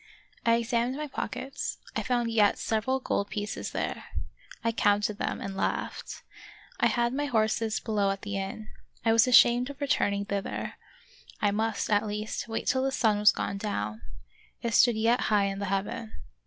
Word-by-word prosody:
I 230 - +6
examined 235 +2 0
my 300 - -3
pockets; 270 -1 -4 0.2
I - - 0
found 240 -2 0
yet 210 -3 +4
several 230 +4 0
gold 200 -5 -1
pieces 205 0 -4
there;. - - -3 0.6
I 230 - +2
counted 205 -1 +1
them, - - -2
and 195 -1 -5
laughed. 195 - -3 0.6
I - - +5
had 240 0 +1
my 290 +2 -1
horses 220 -2 +1
below 210 -3 0
at 195 0 -3
the 205 -1 -4
inn. 195 +2 -4 0.4
I 225 - +5
was 230 +3 +5
ashamed 245 +1 +6
of 280 -1 -9
returning 200 -8 +1
thither, 200 0 -3 0.4
— 485 - -22
I 205 -1 +2
must, 220 +1 -1
at 210 +1 +3
least, 210 +2 -3
wait 225 -1 -3
till 260 - +2
the 270 0 +1
sun 220 -5 +2
was 210 0 +7
gone 200 - -3
down; 110 - -3 0.6
it 230 -1 -1
stood 235 +2 +5
yet 230 +3 +3
high 205 -2 +4
in 195 0 -2
the 200 - -2
heaven. 200 +3 -3
220 Hz, 180 wpm, -28 LUFS, 205-240 Hz, 0.6 s, was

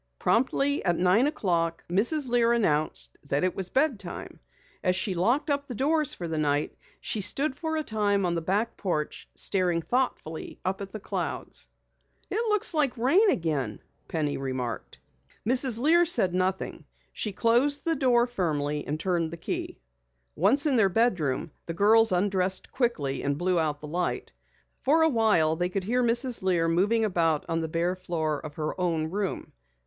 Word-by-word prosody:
Promptly 275 - +1
at 175 -3 +1
nine 185 +9 +3
o'clock 170 - -1
Mrs. 240 - +2
Lear 235 -1 +3
announced 155 -10 0
that 140 +2 -1
it 185 - 0
was 190 -2 -3
bed 270 -5 +1
time. - - -8 0.4
As 180 -1 +2
she 190 +1 0
locked 240 - +1
up 280 0 -1
the 245 - -6
doors 300 +4 +1
for 175 - -5
the 160 -1 -2
night 145 -1 0 0.2
she 215 - -3
stood 270 +8 +2
for 320 +2 -3
a 310 - -1
time 205 -5 0
on 175 - 0
the 170 - -1
back 205 +7 -1
porch, 155 -6 -3
staring 180 -3 +1
thoughtfully 170 -6 -3
at 190 +1 -1
the 215 - -6
clouds. - - -4 0.6
"It 425 +4 0
looks 420 -4 0
like 290 -5 +1
rain 340 - +4
again," 145 - -1 0.3
Penny 150 -3 -2
remarked. 130 -3 -4 0.5
Mrs. 255 -1 +5
Lear 320 +8 +4
said 320 - +3
nothing. 185 +1 -2 0.3
She 210 - -3
closed 245 +8 +2
the 330 -1 +1
door 245 -4 +3
firmly 150 -10 -2
and 150 +2 -3
turned 170 -2 0
the 170 - -8
key. 165 - -4 0.6
Once 230 - +3
in 280 -4 +3
their 200 -4 +4
bedroom, 175 - 0 0.2
the 165 - -4
girls 220 +4 +5
undressed 185 0 0
quickly 150 - -1
and 140 0 -1
blew 180 +1 +1
out 150 -2 -1
the 150 - -7
light. 175 +4 -2 0.5
For 315 +4 +3
awhile 220 - +3
they 175 +1 0
could 190 +1 -3
hear 245 +6 0
Mrs. 240 +1 +1
Lear 175 -3 +1
moving 205 +7 +2
about 165 -6 +1
on 165 - -1
the 160 - -2
bare 170 +3 0
floor 160 -5 -3
of 150 -1 -8
her 155 +4 -4
own 165 -3 -1
room. 200 0 -3
190 Hz, 170 wpm, -27 LUFS, 165-245 Hz, 0.6 s, Mrs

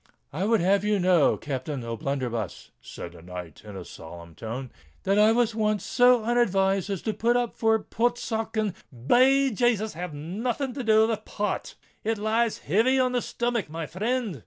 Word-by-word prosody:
"I 175 +7 -1
would 225 -1 +3
have 195 +2 +3
you 210 0 +2
know, 180 -5 +3
Captain 135 -1 -4
O'Blunderbuss," 115 -2 -4
said - - -8
the 85 -1 -14
knight, 90 -1 -9
in 105 -2 -9
a 90 - -8
solemn 85 +1 -11
tone, 115 - -6 0.3
"that 195 +2 +2
I 215 +1 +6
was 235 -1 +2
once 215 -2 0
so 245 -2 +4
unadvised 195 -5 +2
as 195 -4 -3
to 220 - -1
put 235 +3 +2
up 245 -2 -1
for 225 -1 +2
Portsoken——" 225 -2 -1 0.3
Be 265 - +5
Jasus! 220 -1 +1
have 170 -1 -6
nothing 230 - -3
to 265 0 -4
do 220 -1 +5
with 220 -2 -2
Port—it 210 +2 -4
lies 220 +2 +1
heavy 235 +7 +3
on 255 -1 +2
the 250 -1 0
stomach, 235 -7 -2
my 165 +1 -4
frind!" 215 - -2
210 Hz, 170 wpm, -26 LUFS, 150-235 Hz, 0.3 s, I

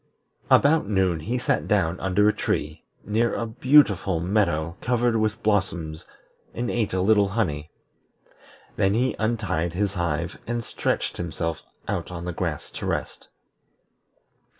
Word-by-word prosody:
About 150 -3 +5
noon 95 -5 +2
he 115 +11 -2
sat 125 - 0
down 95 -4 +1
under 95 +2 +2
a 105 - +4
tree, 75 +2 -2 0.2
near 115 +3 +1
a 115 - -2
beautiful 110 - +3
meadow 85 -3 0
covered 120 -1 +1
with 110 +1 0
blossoms, 95 -7 -1 0.5
and 120 0 -2
ate 115 -3 0
a 95 - 0
little 105 +1 +4
honey. 85 -8 -2 1.1
Then 95 +1 +2
he 125 +3 +1
untied 100 -7 -1
his 100 +1 0
hive 85 -2 -2
and 120 0 -2
stretched - - -2
himself 85 -1 -3 0.3
out - - -2
on 85 -1 -6
the 90 - -3
grass 80 -4 -3
to - - -5
rest. - - -3
95 Hz, 140 wpm, -25 LUFS, 85-110 Hz, 1.1 s, About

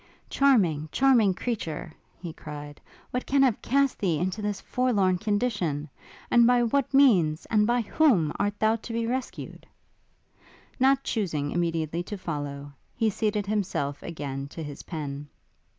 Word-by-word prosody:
Charming, 180 - +3
charming 240 -8 +4
creature! 165 -9 -4 0.3
he 170 -2 -7
cried, 145 -1 -9 0.3
what 250 - -3
can 275 0 +4
have 250 -5 +2
cast 275 +1 +1
thee 175 -6 +1
into 185 +6 -2
this 210 -1 -2
forlorn 200 -8 +1
condition? 205 -9 -1 0.4
And 235 -1 +6
by 245 -1 +4
what 245 +3 0
means 195 - +4
and 210 -1 +3
by 240 +1 +2
whom 210 - +2
art 205 0 0
thou 220 +1 +3
to 230 +1 -8
be 230 0 -1
rescued? 255 +2 -5 1.1
Not 270 +1 +4
chusing 155 - -2
immediately 165 -1 -1
to 205 +4 -6
follow, 145 -4 -5 0.2
he 225 -1 +1
seated 210 0 -1
himself 195 -9 -2
again 140 -4 -5
to 160 +3 -8
his 145 -2 -7
pen. 145 -3 -6
200 Hz, 145 wpm, -26 LUFS, 155-240 Hz, 1.1 s, And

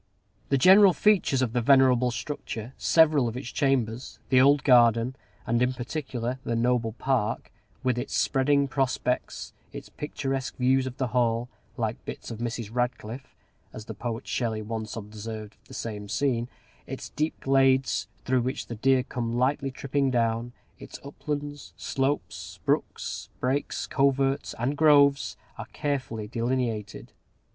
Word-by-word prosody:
The 140 - +3
general 190 +6 +7
features 180 -12 +3
of 115 -3 -2
the 120 - +1
venerable 125 -1 +5
structure, 120 -2 -5
several 155 -6 +4
of 115 +1 -4
its 130 -2 -6
chambers, 125 -3 0
the 130 -1 +5
old 140 +1 +5
garden, 120 -1 +5 0.3
and, 120 0 +1
in 125 +1 +2
particular, 125 -1 -4
the 115 - -1
noble 115 -1 +1
park, 125 -3 -1 0.3
with 125 -1 +1
its 125 - -3
spreading 140 +1 +2
prospects, 130 -2 -2 0.2
its - - -9
picturesque 135 -3 -4
views 130 +1 +2
of 130 0 -7
the 130 -3 -1
Hall, 120 0 +1 0.3
"like 115 -2 -2
bits - - -7
of 115 - -6
Mrs. 115 -2 -4
Radcliffe," 125 0 -3 0.4
as 110 - -8
the 110 - -6
poet 115 +2 -5
Shelley 110 -3 -1
once 110 0 -5
observed 110 0 -7
of - - -28
the - - -11
same 105 -3 -5
scene, 120 0 0 0.4
its - - -6
deep 155 +1 -2
glades, 135 -1 +2 0.2
through 130 -1 +2
which 130 +2 -3
the 120 - -6
deer 130 +3 +3
come 120 -2 -3
lightly 135 +2 +1
tripping 140 +1 -1
down, 115 -1 0 0.3
its - - -10
uplands, 145 0 -5
slopes, 135 +2 -3
brooks, - - -2
brakes, 135 +3 -1
coverts, 135 0 +1
and 125 +5 -1
groves, 140 -8 +4 0.2
are - - -6
carefully 130 -7 -3
delineated. 115 -2 -2
125 Hz, 145 wpm, -27 LUFS, 115-135 Hz, 0.4 s, general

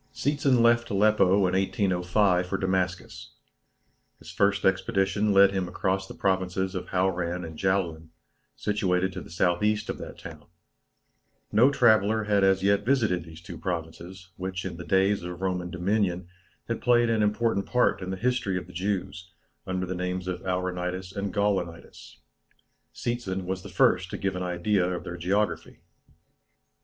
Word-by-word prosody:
Seetzen 135 -1 +1
left 120 0 +3
Aleppo 105 0 +3 0.2
in 90 - 0
1805 95 -1 +1
for 95 - -2
Damascus. 95 -1 -2 0.8
His - - -12
first 100 0 +1
expedition 95 +2 +1
led 100 0 +6
him 95 -2 -2
across 95 +1 -1
the - - -10
provinces 95 -1 -1
of 95 - -5
Hauran 90 -2 -1
and 80 -1 -9
Jaulan, 85 -4 -1 0.5
situated 95 -3 0
to 95 - -6
the - - -12
S.E. 95 +5 +1
of - - -8
that - - -8
town. 75 -3 -11 1.1
No 120 +6 +5
traveller 110 -4 +3
had 105 -2 +2
as 95 0 +3
yet 100 +1 +3
visited 110 -9 +1
these 80 0 -12
two 85 -1 -9
provinces, 85 +2 -6
which 95 0 -4
in 90 -2 -5
the 90 - -7
days 95 +2 +2
of 90 0 -7
Roman 90 -2 -2
dominion 90 -1 -1 0.4
had 115 - -3
played 120 -1 +3
an 110 -1 +1
important 105 -1 +1
part 125 -5 +2
in 90 - -5
the 95 - -3
history 120 -5 0
of 90 - -5
the 90 - -14
Jews, 95 -1 -3 0.4
under 95 0 -2
the 90 - -4
names 90 0 -3
of 90 - -3
Auranitis 90 0 -3
and 100 -1 -3
Gaulonitis. 95 -5 -3 0.7
Seetzen 100 -6 -3
was 95 +1 -3
the 100 - -10
first 90 -1 +2
to - - -5
give 95 -1 -2
an 90 - -4
idea 90 +2 0
of - - -9
their 85 - -6
geography. 100 +5 -1
95 Hz, 160 wpm, -27 LUFS, 90-105 Hz, 1.1 s, led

